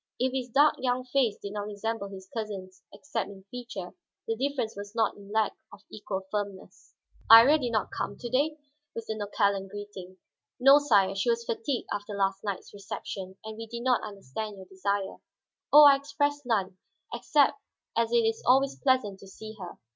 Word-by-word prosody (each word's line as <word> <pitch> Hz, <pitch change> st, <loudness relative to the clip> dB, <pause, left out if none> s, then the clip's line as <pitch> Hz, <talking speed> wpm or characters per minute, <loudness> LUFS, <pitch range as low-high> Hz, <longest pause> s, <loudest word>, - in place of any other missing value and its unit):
If 255 Hz, +1 st, +1 dB
his 255 Hz, -2 st, -3 dB
dark 290 Hz, +5 st, +4 dB
young 255 Hz, 0 st, 0 dB
face 250 Hz, -5 st, +1 dB
did 200 Hz, 0 st, -7 dB
not 205 Hz, 0 st, -4 dB
resemble 210 Hz, 0 st, -3 dB
his 190 Hz, -1 st, -10 dB
cousin's 195 Hz, -4 st, -6 dB
except 210 Hz, -1 st, -4 dB
in 195 Hz, -1 st, -12 dB
feature, 240 Hz, -7 st, -7 dB, 0.4 s
the 225 Hz, -, 0 dB
difference 260 Hz, -2 st, -2 dB
was 205 Hz, +2 st, -8 dB
not 225 Hz, -1 st, +1 dB
in 200 Hz, 0 st, -13 dB
lack 220 Hz, -1 st, +1 dB, 0.2 s
of 205 Hz, -, -13 dB
equal 200 Hz, -2 st, -4 dB
firmness. 200 Hz, -2 st, -6 dB, 0.3 s
"Iría 250 Hz, +7 st, +9 dB
did 245 Hz, -2 st, -1 dB
not 215 Hz, -3 st, -1 dB
come 200 Hz, -, -3 dB
to 240 Hz, -, -6 dB
day?" 285 Hz, +6 st, +1 dB, 0.4 s
was 230 Hz, -, -5 dB
the 220 Hz, -, -3 dB
nonchalant 200 Hz, -2 st, 0 dB
greeting. 190 Hz, -2 st, -9 dB, 0.4 s
"No, 275 Hz, +3 st, +8 dB
sire. 205 Hz, -9 st, +3 dB
She 195 Hz, +4 st, 0 dB
was 235 Hz, 0 st, 0 dB
fatigued 230 Hz, +3 st, -2 dB
after 205 Hz, 0 st, -5 dB
last 195 Hz, -1 st, 0 dB
night's 200 Hz, -3 st, -5 dB
reception, 195 Hz, -1 st, -7 dB
and 220 Hz, 0 st, -7 dB
we 225 Hz, 0 st, -7 dB
did 235 Hz, +1 st, -6 dB
not 250 Hz, -1 st, +3 dB
understand 205 Hz, +1 st, -6 dB
your 190 Hz, -, -10 dB
desire." 195 Hz, +1 st, -2 dB, 0.5 s
"Oh, 300 Hz, +1 st, +10 dB
I 280 Hz, -1 st, +8 dB
expressed 285 Hz, -1 st, -2 dB
none, 195 Hz, -5 st, 0 dB, 0.3 s
except 295 Hz, +7 st, +2 dB, 0.3 s
as 230 Hz, 0 st, +1 dB
it 235 Hz, -1 st, +3 dB
is 225 Hz, 0 st, 0 dB
always 270 Hz, +2 st, +3 dB
pleasant 255 Hz, -8 st, +1 dB
to 195 Hz, -, -13 dB
see 215 Hz, +3 st, -10 dB
her. 180 Hz, -2 st, -8 dB
220 Hz, 185 wpm, -28 LUFS, 200-250 Hz, 0.5 s, Oh